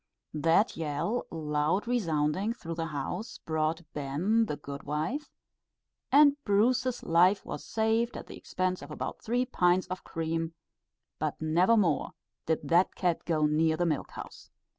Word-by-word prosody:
That 165 +7 +3
yell, 165 +10 -2
loud 155 +4 0
resounding 190 -2 0
through 165 -8 -7
the 165 0 -3
house, 160 - -4
brought 160 +1 -1
"ben" 170 +11 +1
the 150 - -3
good 140 -1 -7
wife, 160 - -3 0.8
and 285 0 +6
Bruce's 245 +5 +2
life 180 +4 +4
was - - -6
saved 225 +2 0
at - - -7
the - - -10
expense 185 0 -2
of 145 - -9
about 150 - -5
three 245 +3 0
pints 180 -6 +2
of 185 0 -5
cream; 165 0 -3 0.6
but - - -2
never 175 +8 +3
more 175 -8 +1 0.3
did 160 -1 0
that 175 +2 +3
cat 175 -3 0
go 155 -3 +2
near 160 +1 +2
the 175 - +1
milk 155 -4 -1
house. - - -10
170 Hz, 150 wpm, -29 LUFS, 155-220 Hz, 0.8 s, and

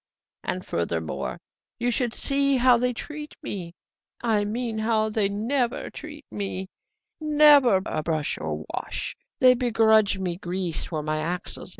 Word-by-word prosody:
And, 185 0 -3
furthermore, 85 -2 -2 0.4
you 245 +1 0
should 240 -1 -1
see 275 -1 +2
how 250 0 +6
they 250 +1 +1
treat 300 +5 -7
me 175 -3 -5 0.5
I 215 -3 +2
mean, 225 +1 -2
how 220 0 +1
they 210 -2 +1
never 235 +5 -1
treat 300 -2 -9
me: 190 -2 -3 0.5
never 295 -9 +6
a - - -2
brush 155 -2 -1
or 80 -1 -3
a - - -7
wash. - - -4 0.3
They 255 -1 +8
begrudge 220 -4 +3
me 180 -2 -2
grease 180 -3 -2
for 155 -3 -4
my 155 0 -1
axles. 175 +3 -3
220 Hz, 150 wpm, -25 LUFS, 180-250 Hz, 0.5 s, They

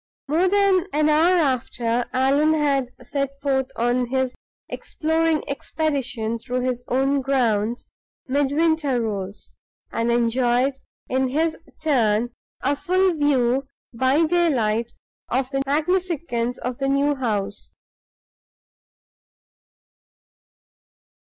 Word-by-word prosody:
More 325 +6 +2
than 390 -2 +3
an 305 +1 +3
hour 330 +4 +4
after 245 -5 0
Allan 280 +4 +3
had 280 -4 +1
set 275 -1 -2
forth 270 -2 0
on 240 +1 +1
his 260 0 -1 0.3
exploring 320 0 -1
expedition 270 -6 -2
through 250 +1 -3
his 250 -1 -2
own 270 +2 +1
grounds, 240 -4 0 0.4
Midwinter 285 0 +1
rose, 200 -3 -5 0.4
and 230 +1 -1
enjoyed, 245 +3 +1 0.3
in 260 +1 +1
his 315 +5 0 0.3
turn, 240 -6 +2 0.3
a 280 +2 +1
full 370 +4 +2
view 270 -3 +1 0.3
by 260 +7 +3
daylight 240 -10 +1 0.4
of 260 +1 -1
the 270 -1 0
magnificence 310 -6 0
of 250 0 -5
the 270 0 0
new 280 +1 +2
house. 210 -7 -3
270 Hz, 100 wpm, -23 LUFS, 240-305 Hz, 0.4 s, hour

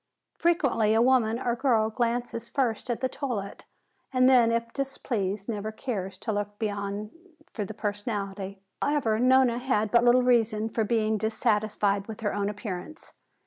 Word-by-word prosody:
Frequently 270 -11 +2
a - - +4
woman 240 -3 +3
or 240 -1 -1
girl 230 -4 +2
glances 235 0 -2
first 250 -3 -1
at 240 - -2
the 260 - +2
toilette, 245 -7 -5 0.5
and 255 -1 +4
then 245 -3 +5
if 230 0 -1
displeased 215 -8 -3
never 215 -2 -3
cares 195 -6 -4
to 220 - -3
look 205 0 -3
beyond 205 -1 -3 0.4
for 210 - -3
the 220 - -7
personality. 205 -2 -4 0.2
However, 265 -7 +1
Nona 255 -1 +4
had 220 -5 0
but 235 0 +5
little 245 +1 +5
reason 225 -3 +2
for 225 0 0
being 215 -1 +1
dissatisfied 210 -2 0
with 220 -1 -8
her 210 -2 -1
own 205 0 -1
appearance. 210 - -7
220 Hz, 155 wpm, -27 LUFS, 205-245 Hz, 0.5 s, then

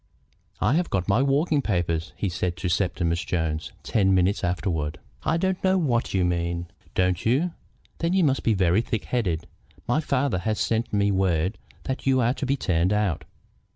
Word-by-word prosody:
"I 105 +7 +2
have 175 +3 +1
got 90 -2 -1
my 100 +6 +3
walking 140 +2 +2
papers," 85 -6 -1
he 100 - -2
said 90 0 -2
to 85 +2 -2
Septimus 85 -2 0
Jones 80 -2 -2
ten 95 -3 +2
minutes 95 +2 +2
afterward. 85 -4 -1 0.2
"I - - +1
don't 190 +1 -1
know 190 0 +4
what 125 -9 +1
you 95 -2 +2
mean." 85 0 -1 0.3
"Don't 90 -1 +1
you? 140 +10 +2 0.5
Then 170 +1 0
you 190 -1 +3
must 135 -3 +2
be 110 - +2
very 95 +2 +3
thick 115 -2 -3
headed. 90 -10 -1 0.4
My 120 +5 +2
father 140 - 0
has 110 +4 -1
sent 115 +1 0
me 100 -1 +2
word 95 -1 +1 0.2
that 130 0 -4
you 130 -1 +4
are 120 0 +3
to 135 - -4
be 140 +1 +1
turned 90 -4 +1
out. 105 -6 0
100 Hz, 185 wpm, -25 LUFS, 90-130 Hz, 0.5 s, know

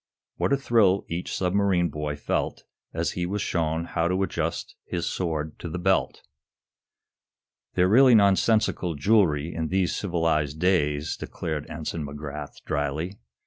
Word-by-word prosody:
What - - 0
a 140 - +4
thrill 110 -8 +3
each 85 +2 -3
submarine 95 -2 +2
boy 75 0 -3
felt 75 - -2 0.3
as - - -1
he 90 0 -2
was 100 +2 -2
shown 80 0 -1
how 85 0 0
to 95 +2 +1
adjust - - -3
his 85 -1 -3
sword 80 -4 -3
to 85 - -6
the 80 - -4
belt! 95 +2 +1 1.5
"They're 90 - +4
really 125 +4 +7
nonsensical 100 -3 +3
jewelry 80 -2 +2
in 80 -1 -2
these 95 +1 0
civilized 80 -6 0
days," 75 -5 +1
declared 80 -3 -5
Ensign 80 0 -4
McGrath, 75 0 -7
dryly. 75 +7 -2
85 Hz, 140 wpm, -26 LUFS, 75-95 Hz, 1.5 s, really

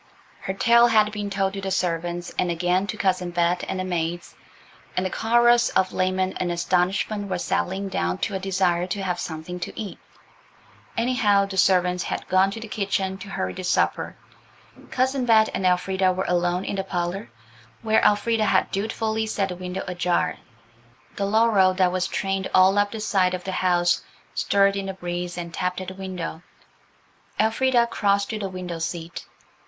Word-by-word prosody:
Her 190 - -4
tale 235 +3 +5
had 215 -2 +3
been 205 -1 -4
told 195 -1 -1
to 195 - -5
the 195 - -3
servants, 175 -1 -2
and 180 - +1
again 180 +3 +1
to 215 - -4
Cousin 185 -3 0
Bet 175 0 +1
and 190 - -3
the - - -1
maids, 175 -1 -3 0.6
and 185 - +1
the 185 - -2
chorus 240 +1 +4
of 185 0 +1
lament 185 0 0
and 175 -1 -1
astonishment 185 +4 0
was 180 -2 -2
settling 195 +2 -1
down 90 - -1
to - - -5
a 190 - -1
desire 185 -2 0
to 195 +1 -3
have 180 -2 -2
something 160 +2 -5
to - - -6
eat; 210 -3 -6 1.0
anyhow, 230 -4 +3
the 195 -1 -7
servants 180 -1 +3
had - - -4
gone 185 +1 +4
to 200 - -6
the 225 - -7
kitchen 195 -2 -2
to 200 - -9
hurry 95 - -3
the - - -7
supper. 175 - 0 0.7
Cousin 260 +1 0
Bet 220 -1 +5
and 185 - 0
Elfrida 185 +1 +2
were 185 +1 -2
alone 175 +1 0
in 200 - -3
the 195 - -1
parlour, 175 -4 -3 0.5
where 220 -1 +3
Elfrida 215 +1 +3
had - - +2
dutifully 220 +2 -1
set 200 -2 -1
the 180 - -4
window 180 +1 -5
ajar. 180 -1 0 0.8
The 200 - -1
laurel 205 -3 +4
that 185 -1 +3
was 185 0 0
trained 195 -1 -2
all 190 +2 +5
up 205 0 +2
that 220 - -5
side 190 -4 +2
of 180 - -7
the 190 - -4
house 175 -1 +2 0.3
stirred 200 0 +2
in 195 -1 -3
the 190 - -4
breeze 175 -1 -4
and 170 -1 -6
tapped 180 0 -2
at 185 - -5
the - - -8
window. 185 -4 -6 1.0
Elfrida 235 +2 +3
crossed 200 -3 0
to 220 - -3
the 195 -2 -3
window 180 -2 -6
seat. 165 0 -5
190 Hz, 180 wpm, -24 LUFS, 180-205 Hz, 1.0 s, tale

